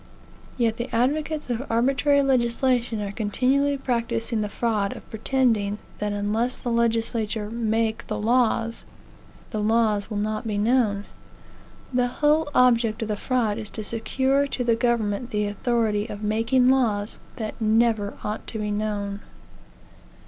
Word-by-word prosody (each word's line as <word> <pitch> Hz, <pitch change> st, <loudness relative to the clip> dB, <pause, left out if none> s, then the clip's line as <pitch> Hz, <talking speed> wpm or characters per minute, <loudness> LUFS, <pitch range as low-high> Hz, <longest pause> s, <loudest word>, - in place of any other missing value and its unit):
Yet 230 Hz, -2 st, +1 dB
the 240 Hz, +2 st, -4 dB
advocates 295 Hz, +4 st, 0 dB
of 240 Hz, +2 st, -1 dB
arbitrary 275 Hz, +4 st, +3 dB
legislation 245 Hz, -3 st, +1 dB
are 200 Hz, -, -4 dB
continually 260 Hz, +7 st, +1 dB
practising 235 Hz, -3 st, -1 dB
the 210 Hz, -, -2 dB
fraud 210 Hz, -2 st, -1 dB
of -, -, -12 dB
pretending 220 Hz, -3 st, +1 dB, 0.2 s
that 210 Hz, 0 st, -1 dB
unless 215 Hz, +5 st, -1 dB
the 240 Hz, -, -4 dB
legislature 225 Hz, -2 st, 0 dB
make 225 Hz, 0 st, -1 dB
the 215 Hz, -, -2 dB
laws, 230 Hz, 0 st, +1 dB, 0.7 s
the 215 Hz, -3 st, -2 dB
laws 215 Hz, -1 st, +2 dB
will 210 Hz, -, -3 dB
not 215 Hz, +2 st, -2 dB
be 210 Hz, -2 st, -1 dB
known. 210 Hz, -2 st, +2 dB, 0.9 s
The 250 Hz, 0 st, +2 dB
whole 295 Hz, +4 st, +2 dB
object 235 Hz, -2 st, +3 dB
of 220 Hz, -, -5 dB
the 210 Hz, -, 0 dB
fraud 230 Hz, -1 st, 0 dB
is 215 Hz, -2 st, -6 dB
to 215 Hz, -, -6 dB
secure 265 Hz, +6 st, 0 dB
to 260 Hz, -2 st, -2 dB
the 235 Hz, -1 st, +3 dB
government 235 Hz, -1 st, 0 dB
the 210 Hz, -2 st, 0 dB
authority 215 Hz, 0 st, 0 dB
of 210 Hz, -2 st, -7 dB
making 230 Hz, +4 st, +2 dB
lawsthat 220 Hz, -3 st, -1 dB
never 220 Hz, -2 st, +2 dB
ought 210 Hz, +1 st, -4 dB
to 225 Hz, -, -5 dB
be 210 Hz, -1 st, -2 dB
known." 205 Hz, -1 st, -2 dB
230 Hz, 140 wpm, -24 LUFS, 210-245 Hz, 0.9 s, arbitrary